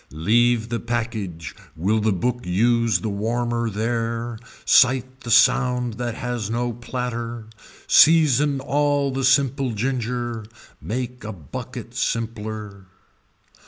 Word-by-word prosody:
Leave 115 +8 +2
the 115 0 -2
package 110 -9 -4 0.2
will 100 +7 +1
the 110 0 +1
book 125 +6 -1
use 115 +1 +2
the - - -3
warmer 115 +3 -1
there, 115 +1 -2 0.3
sight 130 +1 +4
the 120 - -8
sound 125 0 +3
that 120 +1 -4
has 120 -4 -3
no 120 +1 -1
platter, 120 -1 -5 0.4
season 150 -3 +5
all 145 0 +1
the 135 +1 -2
simple 135 -1 +2
ginger, 120 0 -2 0.4
make 125 - -4
a 110 - -5
bucket 80 -10 -8
simpler. 110 -3 -4
120 Hz, 115 wpm, -22 LUFS, 110-125 Hz, 0.4 s, season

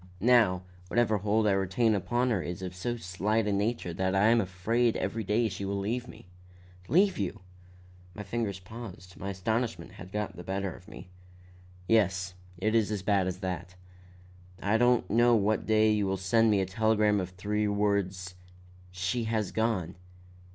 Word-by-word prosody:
Now, 105 -5 +4 0.2
whatever 110 0 +2
hold 105 +2 +1
I 105 - +4
still 95 - +2
retain 105 +4 +2
upon 120 +5 0
her 100 -5 +1
is 90 +2 -5
of 90 0 -5
so 120 +7 -3
slight 105 +3 -1
a 105 - 0
nature 100 -3 -1
that 95 +2 0
I 105 +3 +4
am 115 0 +4
afraid 110 +6 0
every 115 0 -2
day 110 +4 +1
she 95 -1 -5
will 100 +1 -2
leave 115 +5 -2
me." - - -13 0.6
"Leave 190 - +3
you!" 100 +1 -3 0.7
My 105 - -6
fingers 105 -2 -2
paused; 90 -2 -10
my 100 - -5
astonishment 110 +5 -2
had 90 +1 -11
got 105 0 -3
the 90 - -9
better 95 0 -3
of - - -16
me. 90 - -11 0.8
"Yes; 95 -5 +2 0.2
it 110 +5 0
is 110 -3 +3
as 105 -3 -3
bad 100 -2 +2
as 95 +1 -4
that. 90 -1 -4 0.8
I 100 +2 +1
don't 120 0 +3
know 120 +2 +4
what 105 0 +1
day 110 0 +4
you 105 -2 +1
will 95 0 0
send 110 +5 +3
me 100 -2 +3
a - - 0
telegram 105 +1 +2
of 90 -1 -3
three 105 +3 -1
words, 100 -3 -1 0.6
'She 95 +6 -2
has 110 -3 -1
gone. 105 -6 -1
105 Hz, 180 wpm, -29 LUFS, 95-110 Hz, 0.8 s, Now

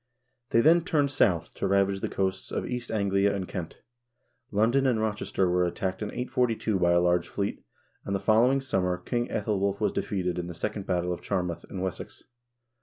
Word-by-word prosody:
They 115 - +4
then 165 +5 +5
turned 150 -6 +1
south 90 - +2
to - - -2
ravage 100 0 +2
the - - -3
coasts 95 -1 -2
of - - -2
East 125 -1 -4
Anglia 100 -1 +1
and 95 -2 -3
Kent. 90 -4 -6 0.7
London 115 +6 +2
and 120 -4 +2
Rochester 105 -3 0
were 90 0 +2
at 85 - -1
tacked 95 +1 -3
in 105 - -2
842 120 -5 0
by 85 -1 +3
a 85 - +5
large 90 0 +2
fleet, 100 0 -3 0.4
and 100 - -2
the - - 0
following 115 +7 +3
summer 90 -8 0
King 120 +5 -2
yEthel 105 -1 -1
wulf 100 0 0
was 105 - +1
defeated 90 -3 -2
in 85 - -4
the 85 - -7
second 100 +3 -4
battle 90 0 0
of 85 - -7
Charmouth, 90 -2 -2
in 95 - -5
Wessex. 95 -2 -5
100 Hz, 195 wpm, -27 LUFS, 90-115 Hz, 0.7 s, then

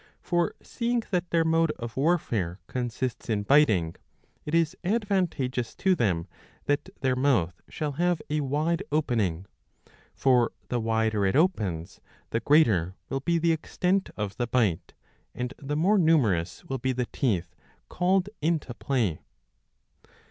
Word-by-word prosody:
For 175 -1 0
seeing 235 0 -1
that 180 -2 0
their 165 -1 +2
mode 165 0 +3
of 120 -1 -6
warfare 120 - 0
consists 125 +1 -3
in 105 -2 0
biting, 105 - +3 0.5
it 150 - -1
is 165 +1 +2
advantageous 180 - -1
to 190 -1 +2
them 95 - 0 0.4
that 145 +5 0
their 130 -2 +2
mouth 115 -11 +1
shall 150 -2 -3
have 175 +3 +1
a 150 0 0
wide 150 +4 0
opening; 110 - 0 0.7
for 125 -3 +3 0.2
the 120 - 0
wider 110 -2 +1
it 95 +3 +2
opens, 105 - 0 0.3
the 115 - +1
greater 105 - +3
will 135 - -1
be 170 +5 +1
the 165 0 +2
extent 180 +4 0
of 105 0 -4
the 120 -1 -1
bite, 110 -9 0 0.4
and 125 +1 -3
the 145 0 -3
more 195 +6 +4
numerous 110 - +2
will 135 -1 -3
be 130 +2 0
the 125 0 -1
teeth 90 - -1 0.3
called 185 +1 +1
into 155 -5 0
play. 115 - -1
135 Hz, 140 wpm, -27 LUFS, 110-165 Hz, 0.7 s, more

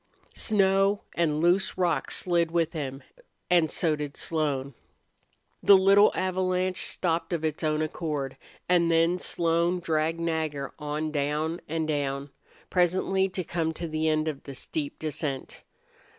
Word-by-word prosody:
Snow 195 -1 +2
and 155 -3 0
loose 180 +3 +2
rock 175 -2 0
slid 170 -2 +1
with 165 0 0
him, 140 -4 -5 0.5
and 170 -3 +4
so 160 -1 +1
did 150 -1 -6
Slone. 145 -4 -1 0.9
The 200 - +8
little 195 +2 +6
avalanche 185 0 0
stopped 170 -1 0
of 160 -2 -1
its 155 0 -2
own 155 0 +1
accord, 150 -4 -3 0.3
and 175 -2 +3
then 165 +2 +3
Slone 170 +1 +1
dragged 160 0 0
Nagger 160 -4 -2
on 150 +1 -3
down 150 +3 -1
and 160 0 -1
down, 140 -2 -2 0.4
presently 190 +2 +2
to 185 0 -3
come 165 -1 -2
to 170 - -4
the 155 0 -1
end 155 0 +1
of 150 -3 -3
the 140 - -9
steep 145 +2 -4
descent. 150 -3 -4
165 Hz, 140 wpm, -27 LUFS, 150-180 Hz, 0.9 s, The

